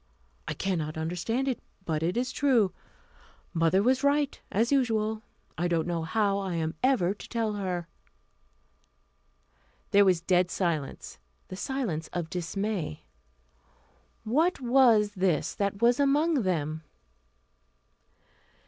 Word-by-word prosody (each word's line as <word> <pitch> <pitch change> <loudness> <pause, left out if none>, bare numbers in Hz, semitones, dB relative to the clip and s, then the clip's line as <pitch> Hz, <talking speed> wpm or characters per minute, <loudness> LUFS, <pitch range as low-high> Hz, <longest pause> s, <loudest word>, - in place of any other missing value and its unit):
I - - -3
cannot 160 -5 -2
understand 180 +11 -2
it, 255 -4 -1 0.3
but 155 -2 -1
it 175 +6 0
is 250 +1 0
true. 245 -9 +2 0.8
Mother 165 +3 +3
was 260 +3 +2
right, 285 0 +1
as 230 +6 +1
usual. 220 -5 +1 0.4
I 175 - +1
don't 170 -2 0
know 170 -1 -2
how 200 +4 +1
I 190 -3 -3
am 160 -1 -1
ever 245 -9 +2
to 205 - -12
tell 225 -2 -1
her." 180 -4 -3 2.0
There 200 0 +6
was 185 -3 +3
a - - -25
dead 180 0 +2
silence 165 -8 -3 0.3
the 185 - -6
silence 200 - -3
of 170 -2 -3
dismay. 180 - -3 1.2
What 310 +11 +1
was 240 -5 +4
this 185 -6 0
that 200 +1 -2
was 240 +2 +4
among 290 +1 +3
them? 160 -5 -1
200 Hz, 125 wpm, -28 LUFS, 175-245 Hz, 2.0 s, There